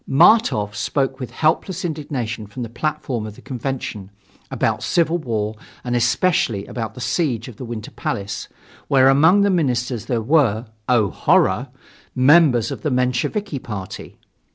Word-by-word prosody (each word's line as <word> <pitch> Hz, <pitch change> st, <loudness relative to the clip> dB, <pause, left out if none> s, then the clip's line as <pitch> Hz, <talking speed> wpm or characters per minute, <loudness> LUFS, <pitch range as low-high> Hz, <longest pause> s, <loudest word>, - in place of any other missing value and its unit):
Martof 140 Hz, -, +4 dB
spoke 135 Hz, +5 st, -1 dB
with 125 Hz, -, -5 dB
helpless 170 Hz, +3 st, 0 dB
indignation 130 Hz, -9 st, -4 dB
from 125 Hz, +4 st, -6 dB
the 115 Hz, -, -6 dB
platform 125 Hz, -3 st, -3 dB
of 105 Hz, -, -9 dB
the -, -, -15 dB
convention, 125 Hz, -6 st, -5 dB, 0.4 s
about -, -, -1 dB
civil 170 Hz, 0 st, +1 dB
war 110 Hz, -6 st, -2 dB, 0.3 s
and 120 Hz, -1 st, -2 dB
especially 120 Hz, -, +1 dB
about 115 Hz, -3 st, -5 dB
the -, -, -9 dB
siege 120 Hz, -1 st, -1 dB
of 120 Hz, -5 st, -11 dB
the 130 Hz, -, -7 dB
Winter 115 Hz, -2 st, -6 dB
Palace, 100 Hz, 0 st, -4 dB, 0.4 s
where 135 Hz, -1 st, +5 dB
among 160 Hz, +9 st, +5 dB
the 200 Hz, 0 st, +3 dB
ministers 125 Hz, -, -1 dB
there 120 Hz, -3 st, 0 dB
were 120 Hz, -5 st, +2 dB, 0.2 s
oh, 110 Hz, -7 st, +3 dB
horror! -, -, +2 dB, 0.5 s
members 130 Hz, -3 st, +5 dB
of -, -, -6 dB
the 155 Hz, -, -1 dB
Mensheviki 125 Hz, -, -1 dB
party. 105 Hz, -6 st, -7 dB
125 Hz, 150 wpm, -21 LUFS, 115-155 Hz, 0.5 s, where